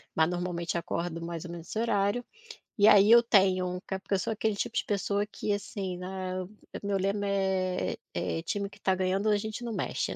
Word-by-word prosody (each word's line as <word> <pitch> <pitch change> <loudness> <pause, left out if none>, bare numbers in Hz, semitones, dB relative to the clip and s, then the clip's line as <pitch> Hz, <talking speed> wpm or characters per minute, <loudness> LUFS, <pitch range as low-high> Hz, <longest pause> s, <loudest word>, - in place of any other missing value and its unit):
Mas 160 0 +4
normalmente 175 -1 -2
acordo 170 0 -2
mais 170 0 -5
ou 170 - -7
menos 170 -1 -8
esse - - -5
horário, 225 +1 +1 0.5
e 205 0 +6
aí 205 0 +7
eu 235 0 +9
tenho 190 -5 +3
um 180 0 -3
ca 190 - -3
porque 200 - -4
eu - - +1
sou 225 - -2
aquele 220 -1 0
tipo - - -3
de - - +1
pessoa 200 0 0
que, 210 - -3
assim, 200 -2 -3
né, 185 0 -4
eu 185 0 -5 0.3
meu 200 -1 0
lema 200 +1 0
é 190 -2 0 0.2
é 165 - -2
"time 200 +3 -2
que - - -16
está 190 - +1
ganhando, 190 +2 0
a 210 - +4
gente 220 +3 -5
não 230 - -3
mexe, - - -2
195 Hz, 220 wpm, -29 LUFS, 180-205 Hz, 0.5 s, eu